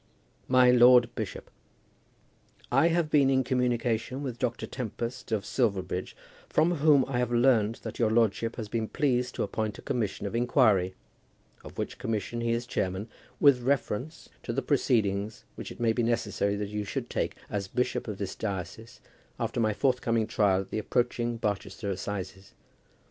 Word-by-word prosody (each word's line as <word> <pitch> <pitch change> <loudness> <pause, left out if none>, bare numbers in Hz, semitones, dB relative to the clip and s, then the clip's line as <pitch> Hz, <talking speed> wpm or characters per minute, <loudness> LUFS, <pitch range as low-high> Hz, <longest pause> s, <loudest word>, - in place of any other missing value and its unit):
MY 130 -1 +6
LORD 120 -1 +6
BISHOP, 110 -3 -6 1.2
I 165 - +5
have 170 -2 +1
been 140 -3 +5
in 130 -1 +3
communication 125 +1 0
with 125 -4 -5
Dr. 120 -1 -2
Tempest, 120 0 -5
of 105 -2 0
Silverbridge, 95 -7 -1 0.3
from 170 +2 +2
whom 145 -2 +5
I 125 -2 -1
have 125 -1 0
learned 120 -3 +3
that 110 - -7
your 115 -2 +3
lordship 115 0 +1
has 110 -3 -5
been 110 +1 -2
pleased 125 -3 0
to - - -1
appoint 105 +1 -3
a - - -12
commission 110 -6 -2
of 100 - -4
inquiry, 115 -6 +3 0.7
of - - -12
which - - -4
commission 115 -1 -3
he 115 0 0
is 120 +1 -1
the - - -19
chairman, 95 +4 -2 0.3
with 140 -4 +5
reference 135 +3 -2
to - - -4
the 135 +4 -2
proceedings 110 -7 0
which - - -8
it - - -11
may 115 -1 +2
be 120 - 0
necessary 105 -3 0
that 100 0 -3
you 105 0 -3
should 100 - -4
take, - - -2
as 100 -2 -3
bishop 125 +5 -1
of 105 -3 -4
this 100 -2 -4
diocese, 110 +4 -6 0.4
after - - -2
my 110 -2 +2
forthcoming 115 -1 +1
trial 100 -3 +2
at 95 - -11
the - - -1
approaching 120 0 -1
Barchester 100 -1 -3
assizes. 95 0 -6
115 Hz, 170 wpm, -28 LUFS, 105-125 Hz, 1.2 s, MY